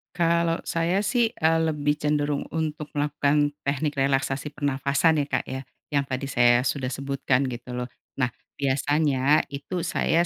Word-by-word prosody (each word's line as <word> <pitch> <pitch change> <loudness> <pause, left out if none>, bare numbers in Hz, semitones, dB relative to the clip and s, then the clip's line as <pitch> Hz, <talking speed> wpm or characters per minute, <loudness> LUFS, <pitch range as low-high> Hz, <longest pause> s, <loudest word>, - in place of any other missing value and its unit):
Kalau 170 -1 +2
saya 175 +5 0
sih, 230 +1 +2
eee, 160 0 +3
lebih 145 -1 +1
cenderung 150 -1 +1
untuk 155 -2 -3
melakukan 145 0 +2
teknik 145 +1 -1
relaksasi 135 +1 0
pernafasan 145 +2 +1
ya, 140 - -3
Kak, - - 0
ya. 130 0 -5 0.3
Yang 140 -1 +2
tadi 130 +1 -2
saya 120 -1 +5
sudah 130 -1 -1
sebutkan 135 -1 0
gitu 125 0 -6
loh. 125 0 -3 0.3
Nah, 125 -2 +1 0.3
biasanya 145 +1 +2
itu 165 +5 -4
saya 170 +1 +2
145 Hz, 145 wpm, -25 LUFS, 135-160 Hz, 0.3 s, saya